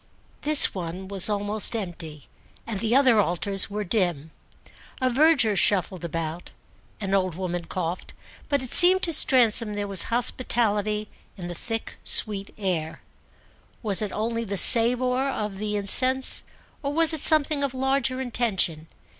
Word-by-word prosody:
This 300 0 +5
one 185 +1 -7
was 195 0 0
almost 205 +2 -3
empty 165 -7 -8 0.4
and 220 -4 -6
the 230 +2 -1
other 255 -5 +3
altars 195 +1 +1
were 210 +1 -5
dim; 175 -7 -3 0.7
a 255 -1 -1
verger 275 -5 +2
shuffled 185 -2 -1
about, 165 0 -6 0.5
an 195 -2 -5
old 185 -3 -1
woman 175 -1 -5
coughed, 175 0 -6 0.3
but 285 -2 -1
it 255 - -8
seemed 370 +1 +6
to 335 - 0
Stransom 230 -6 +2
there 205 0 -4
was 195 -3 +3
hospitality 215 -3 0 0.3
in 175 -2 -8
the - - -6
thick 225 +6 -7
sweet 200 -2 +2
air. 175 -6 -4 0.8
Was 205 -3 0
it 210 -2 -4
only 230 +2 -4
the 200 -2 -5
savour 250 +5 +4
of 210 -6 -5
the 210 +1 -4
incense 255 +6 +2 0.4
or 280 -2 -4
was 325 +1 +4
it 315 - -3
something 305 -2 +3
of 270 -2 -4
larger 265 0 -2
intention? 210 -11 -3
210 Hz, 145 wpm, -23 LUFS, 190-255 Hz, 0.8 s, seemed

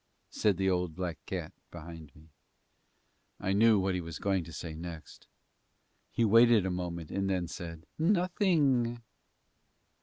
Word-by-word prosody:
said 105 -4 +1
the 95 0 0
old 90 -3 0
black 90 -2 -4
cat - - -4 0.2
behind 80 -3 -10
me. 80 +1 -18 1.1
I 95 - -1
knew 110 +1 +5
what 95 0 0
he 90 - -1
was 85 -1 -7
going 95 -3 0
to 85 - -10
say 80 0 -6
next. 80 0 -9 0.8
He 115 - +1
waited 115 -1 +6
a 95 - -1
moment 85 -3 -4
and 95 0 -1
then 90 -2 0
said, 85 -3 -8
"Nothing." 160 - +2
95 Hz, 145 wpm, -31 LUFS, 85-115 Hz, 1.1 s, waited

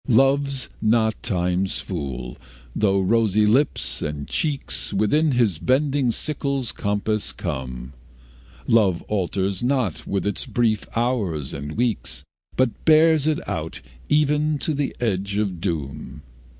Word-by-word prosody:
Love's 135 +2 +3
not 110 0 +3
Time's 90 -2 0
fool, 65 -8 -5 0.4
though 100 -2 +2
rosy 105 +1 +3
lips 130 +8 +2
and 75 -1 -4
cheeks 150 -4 -1
Within 145 +9 +2
his 110 -10 +2
bending 135 +1 +2
sickle's 140 -1 -1
compass 105 +1 -1
come; 65 0 -5 0.7
Love 100 -7 +3
alters 95 -1 -1
not 125 - -1
with 100 - -1
his 100 -1 -1
brief 110 -4 0
hours 105 - -1
and 75 +2 -5
weeks, 120 -1 -1 0.3
But 130 -5 0
bears 155 -1 +5
it 155 -1 -1
out 80 0 -4 0.3
even 150 0 +2
to 150 +3 -1
the 145 -1 -2
edge 100 -3 -1
of 95 -5 -1
doom. 75 -4 -4
110 Hz, 125 wpm, -23 LUFS, 90-135 Hz, 0.7 s, bears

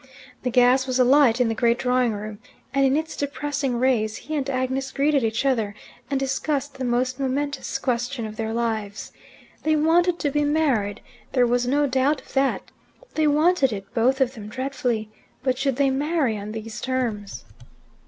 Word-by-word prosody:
The 250 - -1
gas 250 +2 +4
was 255 -1 0
alight 255 -1 +5
in 250 - +3
the 225 - 0
great 235 +1 +2
drawing 250 -2 +1
room, 210 0 -6 0.3
and 275 0 +3
in 270 +1 +3
its 320 +1 -3
depressing 285 -2 -2
rays 230 -4 +1
he 310 - -5
and 280 -2 -1
Agnes 260 0 -1
greeted 280 -1 +2
each 225 +3 0
other, 225 -6 +1 0.3
and 275 -1 0
discussed 275 +1 -1
the - - -2
most 250 +1 0
momentous 280 +2 -2
question 245 0 -2
of 215 0 -7
their 220 0 -3
lives. 220 -3 -3 0.5
They 310 0 +2
wanted 335 +3 +3
to 290 -4 -1
be 295 +1 +1
married: 270 -9 +1 0.3
there 250 -2 +4
was 245 +1 +1
no 290 +3 +2
doubt 265 +2 +1
of - - -17
that. 270 0 0 0.4
They 310 -1 +2
wanted 300 -2 +3
it, 195 -2 -7
both 255 +4 +2
of 260 -1 +2
them, 215 -5 -9
dreadfully. 250 -2 -2 0.3
But 255 -1 0
should 270 -2 +1
they 275 0 +2
marry 285 -3 0
on 205 0 -6
these 220 0 -6
terms? 235 -6 -3
260 Hz, 180 wpm, -24 LUFS, 235-280 Hz, 0.5 s, alight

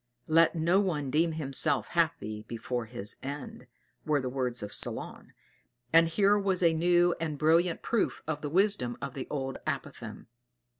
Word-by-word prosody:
"Let 165 +2 +4
no 170 +4 +3
one 150 -9 -1
deem 160 +3 +2
himself 140 -4 +1
happy 155 -11 -1
before 120 +1 -4
his 110 -3 -5
end," 140 +2 -7 0.4
were 150 -2 +1
the 130 -1 -3
words 125 -3 -1
of 105 - -7
Solon; - - -5 0.6
and 165 0 +7
here 200 +5 +3
was 190 -2 0
a 165 -1 +5
new 175 +1 +3
and 155 -3 -3
brilliant 165 +3 +2
proof 230 - -1
of 150 -1 -3
the 145 - -3
wisdom 180 - +1
of - - -5
the 135 - -6
old 135 -2 -4
apothegm. - - -5
155 Hz, 160 wpm, -29 LUFS, 135-175 Hz, 0.6 s, and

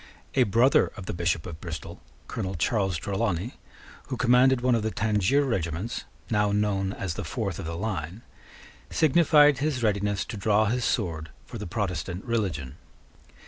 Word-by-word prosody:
A - - +3
brother 120 +6 +4
of 100 - -7
the - - -4
Bishop 85 -2 -1
of 85 -3 -8
Bristol, 85 -3 -7 0.3
Colonel 95 -4 -4
Charles 95 +1 0
Trelawney, 100 +2 -2 0.5
who 130 - -4
commanded 125 +2 +4
one 125 0 +3
of 115 - +2
the 110 - -1
Tangier 110 +5 +2
regiments, 95 - -2 0.3
now 105 -2 +2
known 100 -2 0
as 95 -5 -3
the - - -5
Fourth - - -3
of - - -5
the 85 0 -4
Line, 95 -1 -4 0.7
signified 150 -2 +5
his 140 -4 -1
readiness 100 -2 0
to 110 - -6
draw 105 +2 +3
his 120 +3 0
sword 80 -7 -1 0.2
for 115 - -8
the 105 - -5
Protestant 90 -2 -3
religion. 90 - -2
105 Hz, 160 wpm, -26 LUFS, 90-115 Hz, 0.7 s, signified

